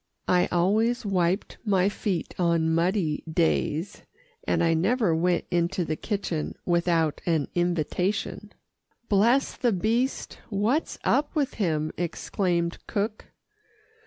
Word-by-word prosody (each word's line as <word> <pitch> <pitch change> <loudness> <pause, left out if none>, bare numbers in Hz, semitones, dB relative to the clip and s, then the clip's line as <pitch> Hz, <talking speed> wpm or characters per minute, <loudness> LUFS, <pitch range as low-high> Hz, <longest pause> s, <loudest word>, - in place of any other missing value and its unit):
I 180 -1 +3
always 220 +7 +1
wiped 185 0 0
my 195 -4 +2
feet 200 -4 -2
on 165 -2 +2
muddy 170 -2 +1
days, 165 +2 0 0.5
and - - +2
I 165 -1 +3
never 190 +2 +2
went 175 +1 +1
into 175 +1 0
the 155 - -2
kitchen 180 -5 -3
without 170 -3 +1
an 160 -4 +1
invitation. 175 +3 -1 0.6
"Bless 235 +7 +3
the 240 - +1
beast 230 +7 -1
what's 225 +9 0
up 290 +3 +1
with 290 -4 0
him?" 155 -4 0
exclaimed 175 0 -1
cook. 215 0 -2
180 Hz, 115 wpm, -26 LUFS, 170-210 Hz, 0.6 s, I